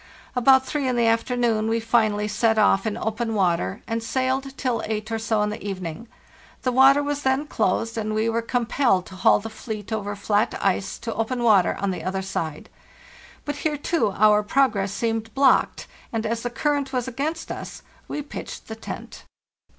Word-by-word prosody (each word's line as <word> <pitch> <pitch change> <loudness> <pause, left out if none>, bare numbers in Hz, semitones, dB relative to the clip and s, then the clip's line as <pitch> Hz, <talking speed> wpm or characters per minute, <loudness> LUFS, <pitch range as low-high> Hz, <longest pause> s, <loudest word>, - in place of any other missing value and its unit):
"About 265 +1 +5
three 275 +1 -2
in 255 - +1
the 235 -1 +2
afternoon 230 -1 +1
we 225 +1 +1
finally 215 -2 +1
set 220 +2 +1
off 205 -1 +3
in 215 - -2
open 225 +1 -2
water 170 - 0
and 225 0 -2
sailed 265 +3 -1
till 245 -4 -1
eight 215 0 -3
or 225 - -1
so 220 -1 +1
in 210 - -1
the 210 - -7
evening; 190 +1 -5 0.6
the 255 - +1
water 270 +3 +6
was 290 0 -2
then 265 +2 +1
closed, 225 -2 0
and 215 0 -2
we 220 +1 +1
were 230 0 0
compelled 235 -4 +1
to 190 - -11
haul 185 - +5
the 215 - -6
fleet 220 -1 -6
over 205 -1 -3
flat 205 +2 0
ice 195 0 0
to 230 - -5
open 240 +2 -2
water 205 -6 +4
on 200 0 0
the 180 - -5
other 190 +1 -2
side. 160 -5 -4 0.8
But 290 - -3
here, 300 -2 -1
too, 310 -4 +1
our 210 0 +5
progress 210 -4 +1
seemed 225 +1 -2
blocked, 275 -1 +3 0.3
and 225 -1 -2
as 230 +1 -1
the 245 - -2
current 285 +3 -1
was 250 -1 -1
against 295 +6 -3
us - - -7 0.2
we 295 - -4
pitched 285 - -8
the 220 - -5
tent." 225 - -8
225 Hz, 190 wpm, -24 LUFS, 210-255 Hz, 0.8 s, water